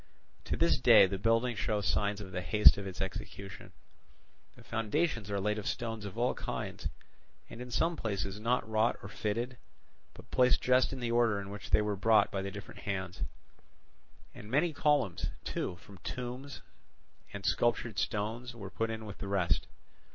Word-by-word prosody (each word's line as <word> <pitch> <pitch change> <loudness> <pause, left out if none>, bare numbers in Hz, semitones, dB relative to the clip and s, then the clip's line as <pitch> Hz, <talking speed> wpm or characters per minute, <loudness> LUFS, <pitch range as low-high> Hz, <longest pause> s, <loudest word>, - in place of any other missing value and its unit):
To - - -1
this - - +3
day - - +8
the 95 0 -3
building 115 +3 +2
shows 105 -1 -1
signs 100 +2 +1
of 95 -2 -8
the 90 - -3
haste 105 +3 +7
of 100 - -5
its 95 - -5
execution; 95 0 -6 0.8
the - - -15
foundations 115 - -1
are 100 -1 -1
laid 105 +2 0
of 105 - -5
stones 115 -3 -3
of 100 +1 -7
all 120 +2 +2
kinds, - - -4 0.6
and 120 - -8
in 125 - -7
some 165 +8 +1
places 100 - -3
not 115 +1 +1
wrought 110 +1 +2
or 100 - -7
fitted, 115 +5 -2 0.6
but - - -14
placed 125 0 +4
just 130 0 +3
in 135 -2 -5
the 120 -1 -1
order 115 -3 +3
in 100 0 -7
which 105 -1 -8
they 105 - +4
were 105 -1 -1
brought 105 +1 +4
by 95 - -1
the 100 - -3
different 105 +1 -9
hands; 95 -2 -4 1.1
and 105 - -10
many 155 +7 +2
columns, 145 - +1 0.2
too, - - -3
from 95 +2 -15
tombs, 125 +7 -6 0.7
and 100 -1 -7
sculptured 120 -2 +1
stones 115 +3 -2
were 100 -4 -8
put 115 0 -1
in 110 -1 -4
with 100 -2 -8
the 100 - -5
rest. 85 -6 +1
105 Hz, 180 wpm, -32 LUFS, 100-120 Hz, 1.1 s, day